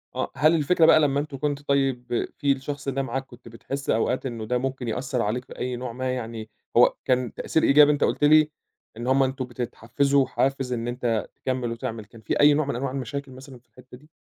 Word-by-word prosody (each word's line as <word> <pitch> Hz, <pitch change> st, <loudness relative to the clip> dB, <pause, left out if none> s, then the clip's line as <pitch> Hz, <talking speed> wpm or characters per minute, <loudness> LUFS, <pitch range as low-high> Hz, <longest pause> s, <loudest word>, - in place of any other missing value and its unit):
آه، 130 Hz, -, -2 dB
هل 155 Hz, +5 st, +4 dB
الفكرة 165 Hz, +2 st, +3 dB
بقى 160 Hz, -, +7 dB
لمّا 140 Hz, -2 st, +2 dB
أنتم 145 Hz, -2 st, -5 dB
كنتوا 145 Hz, 0 st, -3 dB
طيّب 135 Hz, -3 st, 0 dB
في 140 Hz, -1 st, +1 dB
الشخص 140 Hz, +1 st, -3 dB
ده 135 Hz, 0 st, -1 dB
معاك 135 Hz, +1 st, -3 dB
كنت 120 Hz, -2 st, -16 dB
بتحس 135 Hz, +5 st, -6 dB
أوقات 125 Hz, +4 st, +1 dB
إنه 115 Hz, -4 st, -4 dB
ده 125 Hz, +3 st, 0 dB
ممكن 130 Hz, -1 st, -3 dB
يأثر 125 Hz, +2 st, -2 dB
عليك 115 Hz, +4 st, -2 dB
بأي 125 Hz, 0 st, -4 dB
نوع 125 Hz, 0 st, -5 dB
ما، 130 Hz, +1 st, -2 dB
يعني 115 Hz, -3 st, -6 dB, 0.3 s
هو -, -, +6 dB
كان 125 Hz, -2 st, 0 dB
تأثير 160 Hz, -, -1 dB
إيجابي 150 Hz, +1 st, +6 dB
أنت 145 Hz, -, 0 dB
قُلت -, -, 0 dB
لي 155 Hz, +1 st, +6 dB, 0.5 s
إن 120 Hz, +2 st, -5 dB
هُم 135 Hz, +1 st, +4 dB
أنتم 130 Hz, 0 st, -2 dB
بتتحفزوا 125 Hz, +3 st, 0 dB
وحافز 135 Hz, -1 st, -1 dB
إن 120 Hz, 0 st, -3 dB
أنت 120 Hz, -3 st, -1 dB
تكمل 130 Hz, -2 st, -3 dB
وتعمل، 115 Hz, -2 st, -5 dB
كان 110 Hz, +2 st, -16 dB
في 110 Hz, -, -2 dB
أي 145 Hz, 0 st, +7 dB
نوع 150 Hz, +1 st, +1 dB
من 140 Hz, -, -3 dB
أنواع 130 Hz, +2 st, -2 dB
المشاكل 140 Hz, +1 st, -5 dB
مثلًا 130 Hz, 0 st, -12 dB
في 120 Hz, -, -38 dB
الحتّة 125 Hz, 0 st, -15 dB
دي؟ 150 Hz, +4 st, -22 dB
130 Hz, 215 wpm, -25 LUFS, 120-140 Hz, 0.5 s, بقى